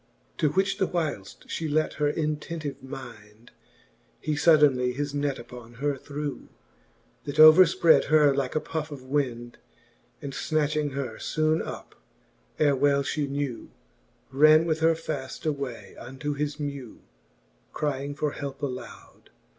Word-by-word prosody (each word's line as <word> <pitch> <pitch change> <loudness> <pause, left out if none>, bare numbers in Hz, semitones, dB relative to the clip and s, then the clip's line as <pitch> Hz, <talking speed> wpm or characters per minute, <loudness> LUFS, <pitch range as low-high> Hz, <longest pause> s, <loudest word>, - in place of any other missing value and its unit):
XIV. - - -39
To 150 - +3
which 195 +2 +1
whileft: 155 - -3
flie 160 - -3
lent 155 +1 0
her 145 - +3
intentive 150 -1 -4
mind, 120 -5 -11 0.7
He 155 - -2
fuddenly 145 -5 +4
his 145 +1 -3
net 145 -1 -1
upon 120 0 -11
her 145 +3 -1
threw, 145 +1 -6 0.8
That 145 - -5
overfprad 160 -1 +7
her 150 -2 +4
like 135 0 -2
a - - +3
puff 160 0 -4
of 140 -3 -9
wind; 125 -3 -3 0.6
And 140 -2 -7
fnatchlng 150 -1 -1
her 130 -5 -4
foone 155 0 0
up, - - -8 0.6
ere 145 -2 +3
well 140 +1 +2
flie 145 +1 -1
knew, 140 -3 -4 0.6
Ran 155 +4 +6
with 160 -2 0
her 165 0 +3
faft: 150 -5 -6
away 140 -5 -4
unto 135 +4 -5
his 145 +1 -3
mew, 140 -5 -6 0.7
Crying 145 -1 -3
for 150 0 -1
helpe 140 0 -7
aloud. 130 -2 -8
145 Hz, 140 wpm, -26 LUFS, 135-155 Hz, 0.8 s, overfprad